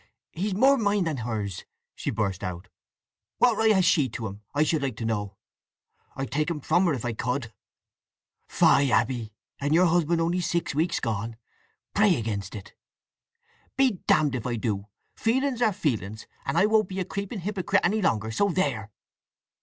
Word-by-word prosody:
"He's 195 Hz, +3 st, -2 dB
more 270 Hz, +6 st, +5 dB
mine 205 Hz, -2 st, +2 dB
than 160 Hz, -4 st, -2 dB
hers!" 110 Hz, -5 st, -4 dB, 0.3 s
she -, -, -4 dB
burst 100 Hz, -4 st, -2 dB
out. 90 Hz, +1 st, -5 dB, 0.7 s
"What 245 Hz, -2 st, +4 dB
right 220 Hz, +1 st, +3 dB
has 190 Hz, -2 st, +3 dB
she 145 Hz, -8 st, +3 dB
to 115 Hz, 0 st, -5 dB
him, 100 Hz, 0 st, -7 dB
I 150 Hz, -, +4 dB
should 155 Hz, -1 st, +1 dB
like 135 Hz, -5 st, -2 dB
to 115 Hz, -, -5 dB
know! 105 Hz, -3 st, -2 dB, 0.8 s
I'd 135 Hz, -3 st, -4 dB
take 155 Hz, +3 st, 0 dB
him 165 Hz, -3 st, -2 dB
from 175 Hz, +6 st, +2 dB
her 165 Hz, -, +2 dB
if 120 Hz, -, -5 dB
I 120 Hz, -, -1 dB
could!" 120 Hz, 0 st, -3 dB, 0.9 s
"Fie, 140 Hz, -3 st, +4 dB
Abby! 120 Hz, -4 st, +1 dB, 0.3 s
And 145 Hz, +2 st, +1 dB
your 180 Hz, +2 st, +5 dB
husband 170 Hz, -1 st, +2 dB
only 170 Hz, +2 st, +1 dB
six 170 Hz, -3 st, -1 dB
weeks 160 Hz, +5 st, 0 dB
gone! 115 Hz, +1 st, -3 dB, 0.6 s
Pray 205 Hz, -3 st, +4 dB
against 105 Hz, -5 st, -4 dB
it!" 100 Hz, -2 st, -9 dB, 1.0 s
"Be 260 Hz, -8 st, +3 dB
damned 150 Hz, -3 st, +3 dB
if 125 Hz, -2 st, -3 dB
I 120 Hz, -, -1 dB
do! 105 Hz, -3 st, -2 dB, 0.3 s
Feelings 250 Hz, +2 st, 0 dB
are 220 Hz, -, +4 dB
feelings! 110 Hz, -, -2 dB, 0.2 s
I 135 Hz, +8 st, +3 dB
won't 215 Hz, -2 st, +3 dB
be 190 Hz, 0 st, -4 dB
a 185 Hz, -, -1 dB
creeping 200 Hz, +2 st, -5 dB
hypocrite 195 Hz, 0 st, 0 dB
any 210 Hz, +5 st, +1 dB
longer—so 110 Hz, -, +1 dB
there!" 140 Hz, -, -1 dB
145 Hz, 170 wpm, -26 LUFS, 110-190 Hz, 1.0 s, more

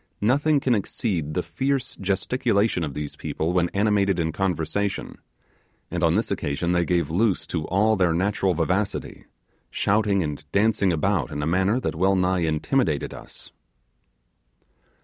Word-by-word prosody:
Nothing 145 Hz, +7 st, +3 dB
can 130 Hz, -2 st, +1 dB
exceed 90 Hz, -7 st, -2 dB
the -, -, 0 dB
fierce 130 Hz, +10 st, -2 dB
gesticulation 100 Hz, 0 st, 0 dB
of 75 Hz, -4 st, -4 dB
these 75 Hz, -1 st, -5 dB
people 80 Hz, +3 st, -3 dB
when 90 Hz, -1 st, +2 dB
animated 100 Hz, -2 st, +1 dB
in 80 Hz, -1 st, 0 dB
conversation, 95 Hz, +2 st, -2 dB, 0.7 s
and -, -, -2 dB
on -, -, +3 dB
this -, -, 0 dB
occasion 75 Hz, +5 st, -1 dB
they 85 Hz, -1 st, +2 dB
gave 85 Hz, -2 st, 0 dB
loose 95 Hz, -2 st, +1 dB
to 80 Hz, -1 st, -3 dB
all 105 Hz, +4 st, +3 dB
their 90 Hz, -4 st, +2 dB
natural 95 Hz, +1 st, +1 dB
vivacity, 95 Hz, +5 st, -2 dB, 0.4 s
shouting 100 Hz, -2 st, +1 dB
and 75 Hz, -1 st, -5 dB
dancing 100 Hz, -2 st, +2 dB
about 85 Hz, -2 st, 0 dB
in 75 Hz, -, -4 dB
a -, -, 0 dB
manner 95 Hz, +8 st, +2 dB
that -, -, -2 dB
well 95 Hz, +4 st, +2 dB
nigh 90 Hz, 0 st, +1 dB
intimidated 80 Hz, -, 0 dB
us. -, -, -11 dB
95 Hz, 150 wpm, -24 LUFS, 80-105 Hz, 0.7 s, Nothing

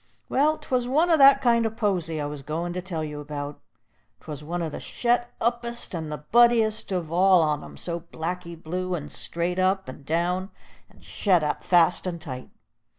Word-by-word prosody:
"Well, 305 Hz, +3 st, +2 dB
'twas 250 Hz, -2 st, -1 dB
one 315 Hz, +7 st, +3 dB
o' 325 Hz, -, +6 dB
that 275 Hz, -1 st, +7 dB
kind 235 Hz, -2 st, +4 dB
o' 225 Hz, -, +1 dB
posy 190 Hz, -8 st, -1 dB
I 145 Hz, -, -2 dB
was 145 Hz, -1 st, -5 dB
goin' 165 Hz, +5 st, -3 dB
to 180 Hz, -, -3 dB
tell 175 Hz, -4 st, -4 dB
you 150 Hz, -1 st, -5 dB
about. 145 Hz, 0 st, -6 dB, 0.6 s
'Twas 150 Hz, -2 st, -8 dB
one 170 Hz, +3 st, -3 dB
o' -, -, -1 dB
the 155 Hz, -, -6 dB
shet 240 Hz, 0 st, 0 dB
uppest 235 Hz, -1 st, -2 dB
and 160 Hz, -3 st, -4 dB
the 150 Hz, -, -3 dB, 0.2 s
buddiest 225 Hz, -3 st, +4 dB
of 175 Hz, -4 st, -2 dB
all 185 Hz, 0 st, +5 dB
on 150 Hz, -1 st, 0 dB
'em, -, -, -11 dB
all 170 Hz, 0 st, -3 dB
blacky 170 Hz, +1 st, -5 dB
blue 180 Hz, +3 st, -3 dB
and 150 Hz, -3 st, -6 dB
straight 170 Hz, +10 st, -2 dB
up 190 Hz, +1 st, +1 dB
and 130 Hz, +2 st, -9 dB
down, 175 Hz, +5 st, -1 dB, 0.4 s
and -, -, -21 dB
shet 180 Hz, -6 st, +1 dB
up 150 Hz, -, -2 dB
fast 175 Hz, +1 st, +3 dB
and 170 Hz, -2 st, -3 dB
tight. 130 Hz, -6 st, -8 dB
175 Hz, 195 wpm, -25 LUFS, 155-220 Hz, 0.6 s, that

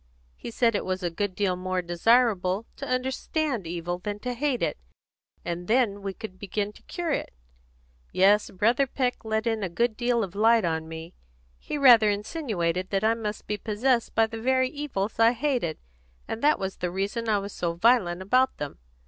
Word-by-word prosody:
He -, -, -8 dB
said 230 Hz, 0 st, +2 dB
it 205 Hz, -, -1 dB
was 185 Hz, 0 st, -3 dB
a 175 Hz, -, -1 dB
good 185 Hz, +2 st, -2 dB
deal 190 Hz, -2 st, +1 dB
more 185 Hz, 0 st, -2 dB
desirable 195 Hz, +2 st, +2 dB
to 275 Hz, -, -6 dB
understand 255 Hz, -, -1 dB
evil 175 Hz, +1 st, -3 dB
than 205 Hz, +3 st, -4 dB
to 250 Hz, -1 st, -3 dB
hate 260 Hz, 0 st, -1 dB
it, -, -, -1 dB, 0.6 s
for 175 Hz, -, -2 dB
then 205 Hz, +3 st, +1 dB
we 195 Hz, 0 st, -3 dB
could 190 Hz, -1 st, -9 dB
begin 205 Hz, +1 st, -3 dB
to -, -, -18 dB
cure 345 Hz, -3 st, -4 dB
it. -, -, -2 dB, 0.8 s
Yes, 200 Hz, +3 st, +4 dB
Brother 230 Hz, +8 st, +2 dB
Peck 250 Hz, -1 st, -2 dB
let 220 Hz, 0 st, -1 dB
in 225 Hz, -2 st, 0 dB
a 190 Hz, -, -2 dB
good 235 Hz, +6 st, 0 dB
deal 240 Hz, 0 st, +1 dB
of 185 Hz, -3 st, -6 dB
light 225 Hz, 0 st, +4 dB
on 160 Hz, -1 st, -1 dB
me. 160 Hz, +1 st, -8 dB, 0.5 s
He -, -, -4 dB
rather 240 Hz, -6 st, +7 dB
insinuated 200 Hz, -, -2 dB
that 195 Hz, 0 st, 0 dB
I 220 Hz, +1 st, +4 dB
must 215 Hz, -2 st, -5 dB
be 210 Hz, -, -2 dB
possessed 230 Hz, +4 st, 0 dB
by 225 Hz, -, +5 dB
the 225 Hz, 0 st, -7 dB
very 260 Hz, +1 st, +2 dB
evils 255 Hz, -9 st, -4 dB
I 230 Hz, +1 st, +6 dB
hated, 245 Hz, -, -1 dB, 0.5 s
and 225 Hz, -, -4 dB
that 300 Hz, +1 st, +4 dB
was 190 Hz, 0 st, -4 dB
the 180 Hz, -, -2 dB
reason 200 Hz, +5 st, -2 dB
I 210 Hz, -, +3 dB
was 200 Hz, 0 st, -5 dB
so 170 Hz, -1 st, -2 dB
violent 185 Hz, -2 st, +2 dB
about 255 Hz, +6 st, +2 dB
them. 145 Hz, -, -6 dB
210 Hz, 190 wpm, -26 LUFS, 185-245 Hz, 0.8 s, rather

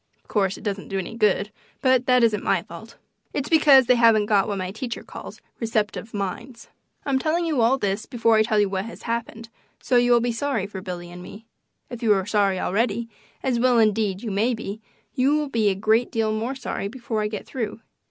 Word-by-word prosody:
Of -, -, -38 dB
course 195 Hz, -3 st, 0 dB
it -, -, -13 dB
doesn't 200 Hz, -2 st, -3 dB
do 195 Hz, -, -3 dB
any 190 Hz, +4 st, -4 dB
good, 210 Hz, -2 st, +1 dB, 0.3 s
but 260 Hz, -2 st, +2 dB
that 250 Hz, -1 st, +4 dB
isn't 220 Hz, -2 st, +2 dB
my -, -, +1 dB
fault. -, -, -12 dB, 0.4 s
It's 285 Hz, -, -3 dB
because 290 Hz, -5 st, +6 dB
they 250 Hz, -, +5 dB
haven't 230 Hz, -3 st, +4 dB
got 205 Hz, -2 st, +2 dB
what 205 Hz, -, -2 dB
my 185 Hz, -1 st, -3 dB
teacher 235 Hz, +3 st, -5 dB
calls -, -, -10 dB, 0.2 s
"receptive 220 Hz, -1 st, -2 dB
minds." 205 Hz, +5 st, -6 dB, 0.4 s
I'm 270 Hz, -2 st, +1 dB
telling 325 Hz, +4 st, 0 dB
you 305 Hz, -7 st, +1 dB
all 240 Hz, +4 st, +4 dB
this 200 Hz, -2 st, -2 dB
before 230 Hz, -3 st, +2 dB
I -, -, +5 dB
tell 215 Hz, -1 st, +2 dB
you 205 Hz, -, +3 dB
what 190 Hz, 0 st, -3 dB
has 230 Hz, -, -10 dB
happened, 230 Hz, -1 st, -4 dB, 0.3 s
so 250 Hz, -, +1 dB
you 245 Hz, 0 st, +3 dB
will 240 Hz, -, +6 dB
be 240 Hz, +1 st, 0 dB
sorry 235 Hz, -4 st, -1 dB
for 195 Hz, -2 st, -7 dB
Billy 175 Hz, -2 st, -7 dB
and 175 Hz, 0 st, -10 dB
me. 205 Hz, +5 st, -11 dB, 0.5 s
If 240 Hz, -1 st, -7 dB
you 220 Hz, -3 st, +4 dB
are 190 Hz, -1 st, -1 dB
sorry 200 Hz, -2 st, +1 dB
already, 230 Hz, +4 st, -1 dB, 0.3 s
as 250 Hz, -3 st, 0 dB
well 250 Hz, 0 st, +3 dB
indeed 210 Hz, -2 st, +1 dB
you 220 Hz, -, -3 dB
may 225 Hz, +5 st, +1 dB
be, 220 Hz, -1 st, -7 dB, 0.3 s
you 275 Hz, +2 st, +2 dB
will 300 Hz, -2 st, -2 dB
be 225 Hz, -5 st, +2 dB
a 195 Hz, -, 0 dB
great 220 Hz, +4 st, +1 dB
deal 220 Hz, -1 st, 0 dB
more 230 Hz, +5 st, -2 dB
sorry 260 Hz, -6 st, -4 dB
before 230 Hz, -1 st, -4 dB
I 210 Hz, -, 0 dB
get 210 Hz, -1 st, -6 dB
through. 225 Hz, -4 st, -4 dB
225 Hz, 220 wpm, -23 LUFS, 205-245 Hz, 0.5 s, because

